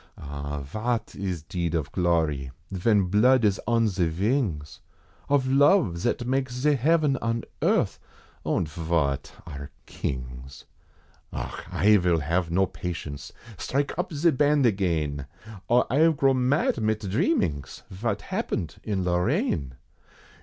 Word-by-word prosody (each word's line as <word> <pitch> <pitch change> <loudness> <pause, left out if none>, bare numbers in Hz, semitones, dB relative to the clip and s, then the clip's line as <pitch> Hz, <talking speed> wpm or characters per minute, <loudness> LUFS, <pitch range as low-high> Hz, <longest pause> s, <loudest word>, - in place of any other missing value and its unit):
Ah 70 0 -5
vot 110 - -3
is 95 -5 -4
deed 85 0 -2
of 75 -4 -2
glory, 80 -7 0 0.2
ven 100 +2 +2
blood 110 +6 +4
is 100 -2 +1
on 115 -1 +3
ze 95 -4 0
vings 90 - -1 0.5
Of 140 -2 +3
love, 140 - +4
zat 120 +7 -1
makes 130 0 -1
ze 150 +3 +3
heaven 145 +1 +2
on 115 0 -1 0.2
earth, - - +1 0.4
und 85 - 0
vot 80 -3 -1
are 70 +1 -8 0.2
kings? 65 0 -6 0.7
Auch! - - -6
I 105 +1 +5
vill 85 -3 +2
have 85 +4 0
no 95 +3 +3
patience. 80 -7 -6 0.3
Strike 140 +2 -1
up 180 - -2
ze 160 +2 +3
Band 145 0 +3
again, 80 - 0 0.4
Or 120 +1 +4
I 160 +4 +5
grow 135 -3 +3
mad 130 -1 +1
mit 110 0 0
dhreamings, 95 - -1
vot 105 +2 -3
happened 80 - -3
in 100 -4 -1
Lorraine! 85 -6 0
95 Hz, 130 wpm, -26 LUFS, 80-125 Hz, 0.7 s, I